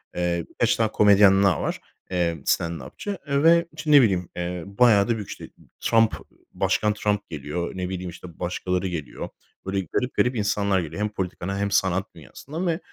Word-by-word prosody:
Eee, 85 -1 -1 0.2
5 - - +4
tane 110 -1 0
komedyen 100 -2 +6
daha 95 -3 +3
var, - - -3 0.3
eee, 85 -2 0
stand-upçı, 85 - -2
eee, 140 0 +1
ve, 170 +1 +6
işte, 155 0 -3
ne 145 -2 +9
bileyim, 95 -7 +1
eee, 90 0 -4
bayağı 100 0 +4
da 120 - +1
büyük. 105 -3 -7
İşte, - - -8 0.3
Trump, 115 -1 +3 0.4
başkan 105 0 +1
Trump 105 -1 -1
geliyor. 75 +3 -4
Ne 90 -1 -3
bileyim, 90 -1 -4
işte, 85 0 -12
başkaları 90 +1 -2
geliyor. 80 -7 -5 0.4
Böyle, 95 +1 -1
garip, 125 0 0
garip 125 +1 +1
insanlar 100 -2 +1
geliyor. 85 +4 -5
Hem 105 - 0
politikana 95 -1 -4
hem 100 0 -1
sanat 95 -1 0
dünyasından 145 - -6
ve 165 -1 0
100 Hz, 175 wpm, -24 LUFS, 90-110 Hz, 0.4 s, ne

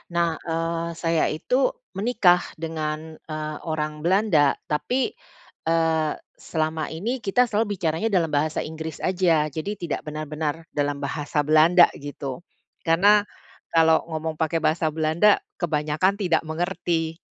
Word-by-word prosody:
Nah, 170 -2 +1
eee, 165 0 -2
saya 165 -1 +1
itu 250 - +1 0.2
menikah 195 -4 +3 0.2
dengan, 155 -1 -4
eee, 155 -1 -5
orang 155 -1 -2
Belanda, 170 -4 +3 0.2
tapi, 255 - 0 0.6
eee, 160 -2 +2 0.3
selama 155 0 -2
ini 235 +9 -2
kita 225 +4 +2
selalu 210 -3 0
bicaranya 165 +4 -1
dalam 175 -7 +1
bahasa 150 +2 0
Inggris 160 0 -7
aja, 170 -5 +2
jadi 160 +8 -4
tidak 170 -5 -4
benar-benar 155 +1 -3
dalam 145 -1 -2
bahasa 145 +1 -1
Belanda 160 +4 +6
gitu. 140 -1 -6 0.5
Karena 200 +6 +6 0.5
kalau 160 0 +4
ngomong 160 0 -4
pakai 160 0 0
bahasa 160 +1 +2
Belanda 160 +6 +3 0.2
kebanyakan 155 +3 +1
tidak 175 -5 +2
mengerti. 165 -1 -2
160 Hz, 125 wpm, -24 LUFS, 155-175 Hz, 0.6 s, Belanda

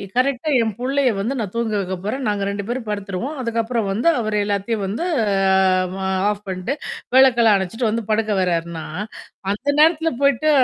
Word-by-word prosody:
கரெக்ட்டா 265 +3 +1
என் 225 -1 0
புள்ளைய 265 +1 +1
வந்து 225 +7 -1
நான் 200 -4 -3
தூங்க 230 -2 -1
வைக்க 190 -1 -3
போறேன். 260 +6 -3
நாங்க 205 -1 0
2 200 0 -3
பேரும் 240 0 -3
படுத்துருவோம். 205 +7 -4
அதுக்கப்புறம் 230 -2 -1
வந்து 220 +10 0
அவரு 215 -2 -1
எல்லாத்தையும் 205 +1 -1
வந்து 210 - -3 1.2
ஆஃப் 210 0 -3
பண்ணிட்டு 185 +7 -3 0.4
விளக்கெல்லாம் 235 -5 +6
அணைச்சுட்டு 220 +5 -2
வந்து 225 +1 -1
படுக்க 215 0 +1
வர்றார்ன்னா, 170 -2 -2 0.7
அந்த 230 +8 -5
நேரத்துல 325 +1 +4
போய்ட்டு 280 +2 +3
225 Hz, 150 wpm, -21 LUFS, 200-255 Hz, 1.2 s, விளக்கெல்லாம்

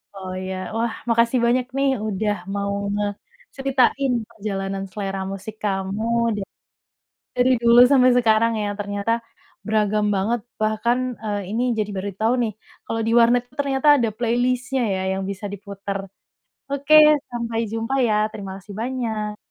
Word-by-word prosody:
Oh 185 -1 -6
ya. 190 - -3 0.2
Wah 230 -1 0 0.2
makasih 230 +2 +3
banyak 245 +1 +2
nih 275 0 +3 0.2
udah 210 +1 0 0.2
mau 200 0 -1 0.2
ngeceritain 260 +6 -1 0.2
perjalanan 195 -3 -4
selera 195 -1 -4
musik 195 +2 -7
kamu 195 +1 -2 0.3
da - - -3 1.0
dari 250 +1 +3
dulu 235 +1 +7
sampai 255 -2 +6
sekarang 230 -1 +3
yang 205 0 -2
ternyata 205 +2 -1 0.5
beragam 215 -1 +1
banget, 220 +5 0 0.2
bahkan, 220 +3 +1 0.3
eee, 205 -1 -1
ini 230 +3 0 0.2
jadi 210 -1 -1
baru 200 +2 -3
tahu 225 +2 +3
nih 220 -2 -1 0.3
kalau 225 0 -2
di 225 - +1
warnet 240 +1 +5
tuh 275 - -25
ternyata 275 +1 +1
ada 235 -4 +1
playlist-nya 245 +2 0
ya 190 - -2
yang 190 0 -2
bisa 200 +1 -7
diputar. 200 0 -5 0.7
Oke, 280 +2 +2 0.4
sampai 235 -1 -3
jumpa 225 +4 -2
ya. 215 - +2 0.2
Terima 195 -2 -7
kasih 195 +1 -11
banyak. 220 -4 -3
220 Hz, 145 wpm, -22 LUFS, 200-245 Hz, 1.0 s, dulu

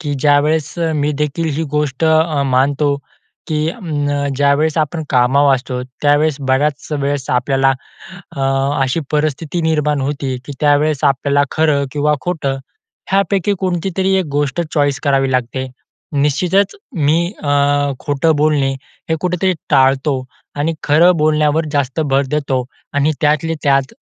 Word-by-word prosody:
की 145 -4 -3
ज्यावेळेस 150 +2 +2 0.2
मी 150 0 0
देखील 155 +2 -1
ही 165 - 0
गोष्ट 150 0 -1
अ, 160 -2 +2
मानतो 140 +2 +1 0.5
की 155 0 0
अ, - - -9 0.6
ज्यावेळेस 145 +3 +2
आपण 155 +2 -1
कामावर 135 +2 +4
असतो, 125 -1 -4 0.2
त्यावेळेस 145 0 +3
बऱ्याच 140 +2 0
वेळेस 140 -2 -2
आपल्याला 135 +2 +2 0.7
अ, - - -4 0.4
अशी 130 +5 0
परिस्थिती 155 +2 -1
निर्माण 150 -2 +1
होती 135 -1 -2
की 145 - -6
त्यावेळेस 150 0 +2
आपल्याला 140 +1 +2
खरं 150 -3 +2
किंवा 150 0 +1
खोटं 150 -6 -2 0.5
ह्यापैकी 195 0 +2
कोणती 185 -1 -1
तरी 190 0 +1
एक 190 -3 0
गोष्ट 145 +2 0
चॉईस 145 -3 +1
करावी 135 -2 +2
लागते. 130 +1 -1 0.5
निश्चितच 165 +8 +1 0.2
मी 165 +3 +1
अ, 145 - 0 0.5
खोटं 145 +2 +1
बोलणे 145 -2 +2 0.4
हे - - +3
कुठेतरी 180 +1 0 0.2
टाळतो 135 0 +2 0.3
आणि 155 +3 0
खरं 165 +5 +5
बोलण्यावर 155 +1 +2
जास्त 140 +1 -1
भर 140 -2 +1
देतो. 140 -4 -1 0.3
आणि 145 +2 +2
त्यातले 155 +2 +1
त्यात 135 -1 +2
145 Hz, 135 wpm, -17 LUFS, 140-160 Hz, 0.7 s, खरं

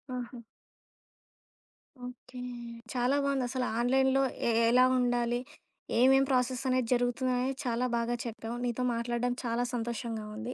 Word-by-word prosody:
ఆహా! 245 0 -6 1.7
ఓకే. 250 0 -10 0.5
చాలా 250 +2 +2
బావుందసల 260 -2 0 0.2
ఆన్‌లైన్‌లో 265 +2 +3 0.3
ఎ - - +3 0.2
ఎలా 255 +1 +6
ఉండాలి? 240 -1 +1 0.6
ఏమేం 270 +2 +6
ప్రాసెస్ 255 0 +1
అనేది 255 -2 +1
జరుగుతుందని 250 +1 +1
చాలా 245 +1 0
బాగా 235 +1 0
చెప్పావు. 230 +1 -5
నీతో 245 +1 -1
మాట్లాడడం 240 +1 -1
చాలా 235 +1 0
సంతోషంగా 230 -1 -3
ఉంది. 235 +3 -5
245 Hz, 115 wpm, -30 LUFS, 235-255 Hz, 1.7 s, ఎలా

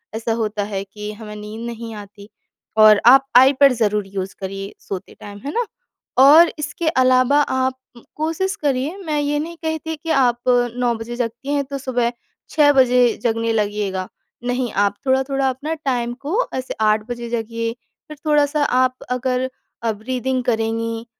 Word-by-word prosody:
ऐसा 225 0 -1
होता 210 -1 -2
है 195 0 -2
कि 210 +1 -7
हमें 210 0 -9
नींद 210 +2 -7
नहीं 230 -1 -7
आती। 200 +1 -16 0.5
और 215 -1 +7
आप 270 +2 +8
आई 265 +2 +7
पैड 275 -1 +5
ज़रूर 210 -2 +1
यूज़ 195 -1 -5
करिए 195 +1 -6
सोते 190 -2 -7
टाइम। 205 0 -10
है 285 - -2
ना? 480 - 0 0.5
और 300 +6 +8
इसके 300 +2 -3
अलावा, 255 +2 +4
आप 260 -2 0 0.4
कोशिश 330 +6 -1
करिए। 280 +4 0
मैं 300 -2 0
ये 290 0 0
नहीं 335 +2 -5
कहती 320 0 -3
कि 325 +2 -9
आप 245 -2 +2
अ, 245 -1 +3
9 245 -1 +1
बजे 225 +2 -6
जगती 240 +3 -4
हैं, 285 - +1
तो 275 +1 -5
सुबह 245 -3 -1 0.4
6 295 -3 +5
बजे 250 -1 +5 0.2
जगने 230 -1 0
लगिएगा। 205 -3 -1 0.4
नहीं, 245 -1 -1
आप 200 0 +1
थोड़ा-थोड़ा 265 0 +1
अपना 285 +5 -3
टाइम। 240 -2 0
को 430 +11 0
ऐसे 260 0 -4
8 215 0 +2
बजे 240 -1 -5
जगिए। 230 0 -3 0.3
फिर 305 -1 -10
थोड़ा-सा 295 0 +2
आप 255 -1 +2
अगर 255 +1 -1 0.3
अ, 225 - +1
ब्रीथिंग 255 +4 -2
करेंगी। 225 0 -1
250 Hz, 165 wpm, -20 LUFS, 220-275 Hz, 0.5 s, आप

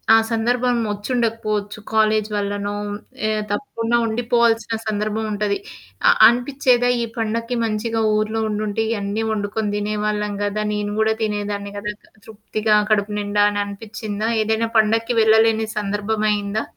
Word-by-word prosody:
ఆ - - +8
సందర్భం 245 +2 +1
వచ్చోడకపోవచ్చు 215 -1 -2
కాలేజీ 215 -1 +2
వల్లనో 205 0 -2 0.5
ఏ - - +1 0.2
తప్పకుండా 230 +1 -1
ఉండిపోవాల్సిన 230 0 +1
సందర్భం 215 +1 -1
ఉంటది. 205 -1 0 0.5
అ - - +8 0.2
అనిపిచ్చేదా? 245 0 +2
ఈ - - 0
పండక్కి 230 +2 -2
మంచిగా 225 +1 -1
ఊర్లో 215 +1 0
ఉండుంటే. 210 +1 -1
ఇవన్నీ 205 +1 -2
వండుకొని 205 0 -2
తినేవాళ్ళం 210 0 -1
కదా! 210 +1 -1
నేను 205 0 -2
కూడా 220 0 +3
తినేదాన్ని 205 -1 -3
కదా! 210 +1 -4 0.3
తృప్తిగా 215 0 -1 0.2
కడుపు 205 0 +2
నిండా 205 0 +1
అని 205 0 -1
అనిపిచ్చిందా? 215 +1 -4
ఏదైనా 220 +1 0
పండక్కి 225 +2 +2
వెళ్ళలేని 220 0 +4
సందర్భం 210 +1 -1
అయిందా? 205 +1 -1
215 Hz, 125 wpm, -21 LUFS, 205-225 Hz, 0.5 s, ఆ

